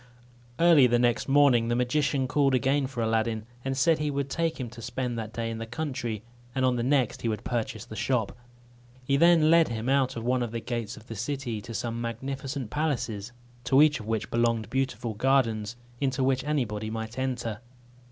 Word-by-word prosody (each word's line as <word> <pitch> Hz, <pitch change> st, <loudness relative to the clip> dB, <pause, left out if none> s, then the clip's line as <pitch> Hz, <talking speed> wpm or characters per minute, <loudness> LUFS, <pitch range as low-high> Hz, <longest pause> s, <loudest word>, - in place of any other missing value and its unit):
Early 165 Hz, -6 st, +6 dB
the 120 Hz, 0 st, +3 dB
next 120 Hz, -1 st, +1 dB
morning 135 Hz, -5 st, +5 dB
the 120 Hz, -, +1 dB
magician 130 Hz, +2 st, +1 dB
called 135 Hz, 0 st, +2 dB
again 135 Hz, +2 st, +1 dB
for 125 Hz, -4 st, -3 dB
Aladdin, 110 Hz, -1 st, 0 dB, 0.2 s
and 135 Hz, 0 st, -2 dB
said 160 Hz, +3 st, +3 dB
he 150 Hz, 0 st, 0 dB
would 140 Hz, -1 st, -2 dB
take 165 Hz, 0 st, -1 dB
him 125 Hz, -, -3 dB
to 120 Hz, -1 st, -10 dB
spend 125 Hz, +1 st, -3 dB
that 110 Hz, -2 st, -5 dB
day 115 Hz, 0 st, -3 dB
in 115 Hz, -, -5 dB
the 115 Hz, -, -5 dB
country, 120 Hz, -5 st, -4 dB, 0.3 s
and 130 Hz, -1 st, +2 dB
on 125 Hz, -1 st, +2 dB
the 120 Hz, -, -1 dB
next 130 Hz, -2 st, +1 dB
he -, -, -2 dB
would 110 Hz, 0 st, -2 dB
purchase 115 Hz, -3 st, -3 dB
the 110 Hz, -, -9 dB
shop. 110 Hz, 0 st, 0 dB, 0.7 s
He 135 Hz, +2 st, +1 dB
then 165 Hz, 0 st, +5 dB
led 165 Hz, -1 st, +6 dB
him 115 Hz, +1 st, -3 dB
out 135 Hz, -2 st, +2 dB
at 115 Hz, -, -4 dB
one 125 Hz, +1 st, +1 dB
of 120 Hz, -, -1 dB
the 115 Hz, -, -3 dB
gates 115 Hz, -2 st, -4 dB
of 110 Hz, -, -13 dB
the 115 Hz, -, -7 dB
city, 120 Hz, -1 st, -3 dB
to 115 Hz, +2 st, -8 dB
some 115 Hz, 0 st, -3 dB
magnificent 130 Hz, +1 st, -4 dB
palaces, 125 Hz, -8 st, -2 dB, 0.3 s
to 135 Hz, +3 st, +6 dB
each 150 Hz, -3 st, +3 dB
of 110 Hz, -, -9 dB
which 110 Hz, -1 st, -2 dB
belonged 115 Hz, -2 st, +1 dB
beautiful 125 Hz, -3 st, -1 dB
gardens, 115 Hz, -2 st, +1 dB, 0.2 s
into 135 Hz, -1 st, 0 dB
which 130 Hz, 0 st, +1 dB
anybody 110 Hz, -8 st, -1 dB
might 110 Hz, +2 st, -5 dB
enter. 125 Hz, -5 st, -2 dB
125 Hz, 200 wpm, -27 LUFS, 115-135 Hz, 0.7 s, Early